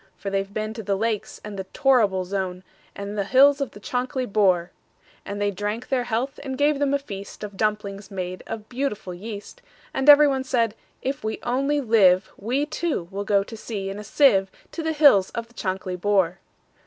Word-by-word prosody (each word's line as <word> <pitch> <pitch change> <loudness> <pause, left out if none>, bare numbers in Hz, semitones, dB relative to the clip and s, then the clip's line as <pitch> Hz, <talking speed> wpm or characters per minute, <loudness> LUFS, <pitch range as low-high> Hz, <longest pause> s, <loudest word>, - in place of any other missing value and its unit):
For 195 - -5
they've 195 0 -1
been 215 +1 -3
to 225 - -6
the 200 -1 -1
Lakes, 220 +1 -2
and 210 -2 -7
the 190 - -4
Torrible 205 -5 +2
Zone, 185 -1 -3 0.3
And 200 +1 -5
the 200 - 0
hills 275 +6 +5
of 275 - -1
the 205 - -13
Chankly 255 +4 -2
Bore."And 195 0 -2
they 205 0 +1
drank 205 +4 -4
their 255 -2 +1
health, 245 +4 -2
and 265 -2 -5
gave 290 0 +2
them 280 -1 +2
a - - +3
feastOf 205 -4 -8
dumplings 205 -1 -2
made 185 -2 -5
of 220 -1 -6
beautiful 245 -8 -3
yeast; 210 - -8 0.3
And 270 +2 +2
every 295 0 +9
one 265 -2 0
said, 240 -5 +1 0.3
"If 270 -2 -3
we 220 0 -2
only 275 +4 +1
live, 195 -6 +4
We, 255 +8 -1
too, 300 - -2
will 200 +1 -4
go 200 -1 +3
to 225 - -9
sea 205 -3 -5
in 200 - -6
a - - -7
sieve, 205 -5 +4 0.2
To 335 - -5
the 320 0 -1
hills 280 -11 +6
of 230 0 -4
the - - -22
Chankly 185 -3 -3
Bore." 190 -3 +2
215 Hz, 195 wpm, -24 LUFS, 195-265 Hz, 0.3 s, every